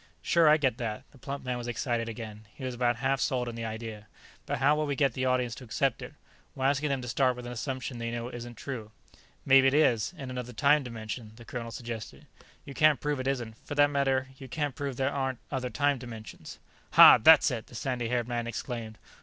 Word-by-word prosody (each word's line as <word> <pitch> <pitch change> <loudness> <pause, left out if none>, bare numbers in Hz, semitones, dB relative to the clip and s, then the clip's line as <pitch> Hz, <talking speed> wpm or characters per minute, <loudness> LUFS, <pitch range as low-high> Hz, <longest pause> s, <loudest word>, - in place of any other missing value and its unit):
"Sure. 170 -3 +4
I 155 - +6
get 130 -6 0
that." 110 -3 -4
The 135 - -19
plump 140 +1 -6
man 125 -1 -2
was 120 - -6
excited 120 -1 -2
again; 110 -2 -8
he - - -10
was 130 -1 -3
about 120 0 +1
half 135 +3 0
sold 125 -4 0
on 120 - -4
the 115 0 -5
idea. 110 -1 -6 0.4
"But - - -1
how 145 +3 +4
will 155 0 -1
we 140 - -1
get 135 -3 +2
the 130 +1 -2
audience 125 -2 +1
to - - -9
accept 125 +1 -1
it? - - -9 0.4
We're 130 - -2
asking 140 +2 +2
them 135 -2 -1
to - - -6
start 125 +1 +2
with 125 0 -8
an 120 - -6
assumption 130 0 -4
they 115 0 -3
know 120 0 -4
isn't 120 -1 -8
true." 120 -6 -6 0.6
"Maybe 135 0 +6
it 135 - +3
is, 120 -8 +3
in 135 -4 -6
another 125 -1 -5
time 145 +5 +4
dimension," 110 -2 -7
the 120 0 -13
colonel 115 -1 -5
suggested. 115 -2 -7 0.4
"You 140 - -8
can't 155 0 +4
prove 150 -2 -1
it 130 - -3
isn't. 120 -5 -2
For 145 - -6
that 145 0 +4
matter, 135 -2 +1
you 135 - -9
can't 145 +1 -2
prove 140 -1 -4
there 135 +1 0
aren't 135 -2 -1
other 130 -2 -2
time 145 +2 +1
dimensions." 115 -3 -9 0.4
"Hah, - - +10
that's 155 +4 +7
it!" 115 -3 -4
the - - -14
sandy 120 -1 -2
haired 120 -1 0
man 120 -1 -2
exclaimed. 115 -2 -5
125 Hz, 230 wpm, -29 LUFS, 115-135 Hz, 0.6 s, Hah